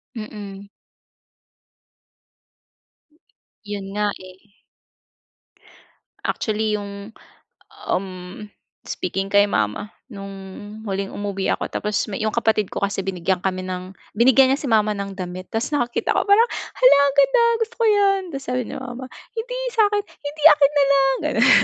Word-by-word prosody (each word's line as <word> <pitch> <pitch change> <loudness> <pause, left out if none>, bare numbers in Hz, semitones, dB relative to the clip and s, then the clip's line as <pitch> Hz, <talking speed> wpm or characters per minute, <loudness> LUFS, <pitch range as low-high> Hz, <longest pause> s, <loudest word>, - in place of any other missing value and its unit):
Mm. 205 -3 -8 3.0
Yun 205 -2 -5
nga 210 0 +2 0.2
eh. 195 +3 -21 1.7
Actually 215 0 -1
yung 200 +1 -7 0.7
um, 190 +1 -1 0.7
speaking 195 +2 -3
kay 200 0 +5
mama, 110 - -2 0.2
nung 195 -3 -8 0.6
huling 195 0 -3
umuwi 200 -1 -1
ako - - -3
tapos 210 0 -1
me 195 - -3
yung 215 0 -1
kapatid 220 -3 +1
ko - - -4
kasi 200 0 -1
binigyan 185 -1 -1
kami 185 0 -2
ng 185 0 -6 0.2
binigyan 260 +3 +6
niya 275 - +1
si - - -5
mama 215 -3 +3
ng 200 0 -4
damit. 185 -1 -6
Tas 225 +4 -1
nakakita 245 -5 0
ko - - +1
parang, 430 +4 +5 0.3
"Hala, - - +6
ang 280 -1 0
ganda! 280 - +5 0.2
Gusto 455 +1 -2
ko 465 - +2
yan!" 400 -2 +4
Tas 275 - -4
sabi 250 -1 -1
ni - - -8
mama, 250 +1 -7 0.3
"Hindi, - - -3
sa 445 -2 +4
akin." 410 0 0
"Hindi 295 -5 -9
akin 290 -2 +5
na 290 - +5
lang," 270 -1 +4
gano'n. - - +4
215 Hz, 140 wpm, -22 LUFS, 195-275 Hz, 3.0 s, binigyan